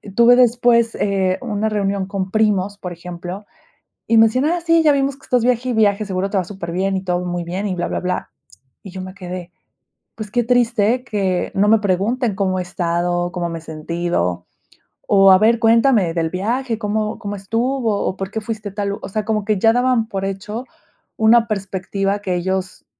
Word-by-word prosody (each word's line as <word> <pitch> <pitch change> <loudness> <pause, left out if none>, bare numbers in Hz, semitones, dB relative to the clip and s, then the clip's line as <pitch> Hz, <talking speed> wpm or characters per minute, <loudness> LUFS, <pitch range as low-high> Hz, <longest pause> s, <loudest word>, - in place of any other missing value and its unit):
tuve 235 +2 +6
después, 240 -1 +3
eh, 190 -2 0
una 220 -3 -1
reunión 200 -2 -1
con 195 -1 -4
primos, 205 -1 +1
por 180 -3 -6
ejemplo, 180 +3 -8 0.6
y 230 - +3
me 225 - +8
decían, 255 +5 +1
ah 340 +2 0
sí, 330 -1 +4
ya 305 - +5
vimos 275 0 0
que 275 - -20
estás 245 -2 +1
viaje 250 0 +1
y - - 0
viaje, 215 -1 +2
seguro 190 0 -2
te 200 - 0
va 185 - +1
súper 175 -2 -7
bien 190 +2 0
y 190 - -5
todo 180 -1 -1
muy 175 -1 -3
bien 185 +4 -3
y 185 - -2
bla 175 0 -2
bla - - -2
bla, 180 0 -3 0.5
y 195 - -9
yo 190 0 -7
me 185 0 -8
quedé, 180 -2 -7 0.6
pues 215 -2 -7
qué 240 +3 +1
triste 240 -1 +2
que 195 -6 -1
no 200 +2 +3
me 220 0 +5
pregunten 210 +4 0
cómo 190 -1 0
he - - 0
estado, 175 0 -1
cómo 175 -2 -3
me 165 - -5
he 165 - -9
sentido, 155 - -2 0.6
o, 195 -1 +6
a 190 - +8
ver 225 +3 +4
cuéntame 225 -5 +3
del 165 -1 -1
viaje, 230 +5 -2
cómo 215 0 -2
cómo 205 -2 -5
estuvo, 225 +2 -1
o, 185 - -2
por 195 0 -5
qué 220 - -3
fuiste 215 -1 -5
a 195 - -18
tal 205 -1 -2
lu 200 - -3
o - - -6
sea, 215 +1 -3
como 215 -2 0
que 215 -1 0
ya 225 +4 +4
daban 245 -2 +1
por 195 -3 -3
hecho 210 +5 -5 0.5
una 225 +1 +5
perspectiva 195 -1 -2
que 185 -3 -2
ellos 190 +1 -3
200 Hz, 210 wpm, -19 LUFS, 185-225 Hz, 0.6 s, me